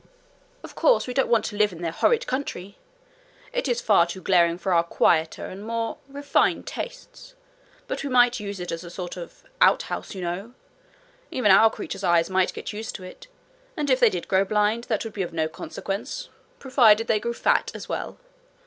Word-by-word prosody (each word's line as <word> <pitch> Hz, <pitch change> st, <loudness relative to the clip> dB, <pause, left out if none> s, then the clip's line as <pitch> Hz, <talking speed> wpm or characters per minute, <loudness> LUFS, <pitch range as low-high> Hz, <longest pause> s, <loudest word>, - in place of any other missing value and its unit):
Of -, -, -10 dB
course -, -, +3 dB
we 250 Hz, -, -5 dB
don't 270 Hz, -, +1 dB
want 225 Hz, -2 st, +3 dB
to 210 Hz, -, -5 dB
live 210 Hz, 0 st, +2 dB
in 170 Hz, -1 st, -9 dB
their 165 Hz, -, -1 dB
horrid 465 Hz, -, +2 dB
country! 205 Hz, -7 st, -4 dB, 0.8 s
It -, -, -1 dB
is 240 Hz, -2 st, 0 dB
far 195 Hz, -5 st, +4 dB
too 180 Hz, +2 st, -6 dB
glaring 170 Hz, -3 st, +3 dB
for 185 Hz, 0 st, -1 dB
our 170 Hz, -, +5 dB
quieter 160 Hz, -1 st, +1 dB
and 195 Hz, +2 st, -8 dB
more 230 Hz, +1 st, -3 dB
refined 285 Hz, +1 st, 0 dB
tastes. -, -, -8 dB, 0.5 s
But -, -, -4 dB
we 280 Hz, -, -3 dB
might 245 Hz, -1 st, +4 dB
use 200 Hz, -2 st, -6 dB
it 180 Hz, -, -5 dB
as 165 Hz, +1 st, -5 dB
a 175 Hz, -, -9 dB
sort 175 Hz, 0 st, -6 dB
of 175 Hz, -2 st, -10 dB, 0.2 s
outhouse, -, -, +2 dB
you 190 Hz, -, -6 dB
know. 190 Hz, +8 st, -5 dB, 0.7 s
Even 230 Hz, -6 st, +2 dB
our 220 Hz, +4 st, +7 dB
creatures' 200 Hz, -, -7 dB
eyes 170 Hz, 0 st, +2 dB
might 185 Hz, 0 st, +2 dB
get -, -, -7 dB
used 220 Hz, +1 st, -6 dB
to 190 Hz, -, -8 dB
it, 185 Hz, -, -11 dB, 0.5 s
and 295 Hz, -3 st, 0 dB
if 255 Hz, -, +4 dB
they 240 Hz, -, +6 dB
did 180 Hz, -4 st, -5 dB
grow 190 Hz, 0 st, +3 dB
blind 210 Hz, +3 st, +1 dB
that 220 Hz, -3 st, -1 dB
would 225 Hz, -2 st, -7 dB
be 200 Hz, -, -3 dB
of 175 Hz, -, -4 dB
no 160 Hz, -1 st, 0 dB
consequence, 200 Hz, -, -6 dB, 0.3 s
provided 230 Hz, -5 st, +4 dB
they 220 Hz, -2 st, +2 dB
grew 235 Hz, +2 st, -3 dB
fat -, -, +2 dB
as -, -, -8 dB
well. -, -, -4 dB
210 Hz, 200 wpm, -24 LUFS, 180-245 Hz, 0.8 s, our